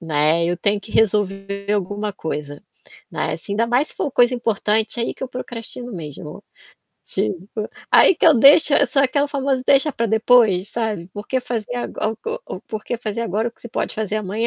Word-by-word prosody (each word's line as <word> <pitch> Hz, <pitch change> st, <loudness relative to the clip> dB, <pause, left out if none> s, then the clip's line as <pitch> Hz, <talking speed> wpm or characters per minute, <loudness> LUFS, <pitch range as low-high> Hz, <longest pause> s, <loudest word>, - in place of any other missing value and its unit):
né, 160 Hz, 0 st, +1 dB
eu 175 Hz, +1 st, 0 dB
tenho 205 Hz, 0 st, 0 dB
que 215 Hz, -, -13 dB
resolver 200 Hz, -1 st, 0 dB
alguma 205 Hz, +1 st, -2 dB
coisa, 150 Hz, -5 st, -6 dB, 0.5 s
né, 155 Hz, -, -2 dB
assim, 165 Hz, +5 st, -7 dB
ainda 230 Hz, +3 st, +1 dB
mais 245 Hz, +5 st, +1 dB
se -, -, -5 dB
for 285 Hz, -, -2 dB
coisa 245 Hz, +1 st, +4 dB
importante, 220 Hz, -1 st, 0 dB
aí 235 Hz, -, -1 dB
que -, -, -11 dB
eu 260 Hz, -, -3 dB
procrastino 245 Hz, -1 st, -6 dB
mesmo. 150 Hz, -3 st, -8 dB, 0.6 s
Tipo, 195 Hz, -, -3 dB, 0.2 s
aí -, -, +6 dB
que 330 Hz, -, +2 dB
eu 320 Hz, -, +7 dB
deixo 285 Hz, +4 st, +7 dB
é 285 Hz, -, +5 dB
sou 275 Hz, +2 st, +2 dB
aquela 285 Hz, +2 st, +1 dB
famosa 275 Hz, -2 st, -1 dB
"deixa 280 Hz, +2 st, +4 dB
para 230 Hz, -1 st, -1 dB
depois", 220 Hz, -3 st, +3 dB
sabe, 210 Hz, -7 st, -3 dB
por 205 Hz, 0 st, -7 dB
que 260 Hz, -1 st, 0 dB
fazer 245 Hz, -1 st, -4 dB
ago 220 Hz, -2 st, -3 dB, 0.3 s
o -, -, -6 dB
o -, -, -11 dB
por 215 Hz, -1 st, -7 dB
que 240 Hz, -, -3 dB
fazer 230 Hz, 0 st, -4 dB
agora, 220 Hz, +2 st, -1 dB
o 235 Hz, -, -15 dB
que -, -, -27 dB
você 240 Hz, -, -8 dB
pode -, -, -3 dB
fazer 215 Hz, -1 st, -2 dB
amanhã? 215 Hz, +2 st, -2 dB
220 Hz, 205 wpm, -20 LUFS, 200-245 Hz, 0.6 s, eu